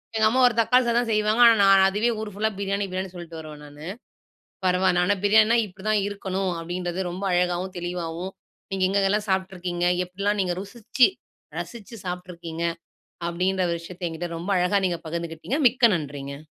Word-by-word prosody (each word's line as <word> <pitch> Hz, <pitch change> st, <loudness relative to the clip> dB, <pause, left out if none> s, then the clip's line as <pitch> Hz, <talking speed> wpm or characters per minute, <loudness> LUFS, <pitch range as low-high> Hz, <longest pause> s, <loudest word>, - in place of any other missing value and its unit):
எங்க 220 Hz, -1 st, +3 dB
அம்மா 255 Hz, +3 st, +2 dB
ஒரு 245 Hz, -, +1 dB
தக்காளி 250 Hz, +3 st, +4 dB
சாதம் 235 Hz, 0 st, +1 dB
செய்வாங்க 215 Hz, +2 st, +2 dB
ஆனா 230 Hz, -1 st, +8 dB
நான் 195 Hz, -1 st, +7 dB
அதுவே 210 Hz, +5 st, +1 dB
ஊர் 215 Hz, -1 st, -5 dB
ஃபுல்லா 215 Hz, +2 st, 0 dB
பிரியாணி 200 Hz, 0 st, -1 dB
பிரியாணின்னு 185 Hz, 0 st, -4 dB
சொல்ட்டு 170 Hz, -2 st, -8 dB
வருவேன் 155 Hz, -2 st, -10 dB
நானு. 145 Hz, +2 st, -11 dB, 0.8 s
பரவால்ல. 180 Hz, -1 st, +3 dB
ஆனா 205 Hz, +2 st, +2 dB
பிரியாணின்னா 220 Hz, +3 st, +5 dB
இப்பிடித்தான் 205 Hz, +2 st, -1 dB
இருக்கணும், 195 Hz, -2 st, -2 dB
அப்பிடின்றத 175 Hz, +2 st, -3 dB
ரொம்ப 185 Hz, +3 st, -6 dB
அழகாவும், 180 Hz, +1 st, 0 dB
தெளிவாவும் 175 Hz, +1 st, -4 dB, 0.4 s
நீங்க 190 Hz, -1 st, -1 dB
எங்கெல்லாம் 200 Hz, +2 st, +1 dB
சாப்ட்டுருக்கீங்க, 185 Hz, -2 st, -1 dB, 0.2 s
எப்பிடிலாம் 200 Hz, +3 st, -1 dB
நீங்க 180 Hz, -2 st, 0 dB
ருசிச்சு, 230 Hz, +4 st, +2 dB, 0.5 s
ரசிச்சு, 235 Hz, -1 st, -8 dB
சாப்ட்டுருக்கீங்க, 175 Hz, -2 st, -5 dB, 0.6 s
அப்பிடின்ற 185 Hz, +2 st, 0 dB
ஒரு 170 Hz, -, 0 dB
விஷயத்த 175 Hz, +1 st, -6 dB
என்கிட்ட 165 Hz, +2 st, -5 dB
ரொம்ப 175 Hz, +4 st, -4 dB
அழகா 180 Hz, +3 st, +2 dB
நீங்க 170 Hz, -2 st, -3 dB
பகிர்ந்துக்கிட்டீங்க. 170 Hz, -, -3 dB
மிக்க 245 Hz, -1 st, +4 dB
நன்றிங்க. 145 Hz, -1 st, -6 dB
185 Hz, 155 wpm, -25 LUFS, 175-205 Hz, 0.8 s, ஆனா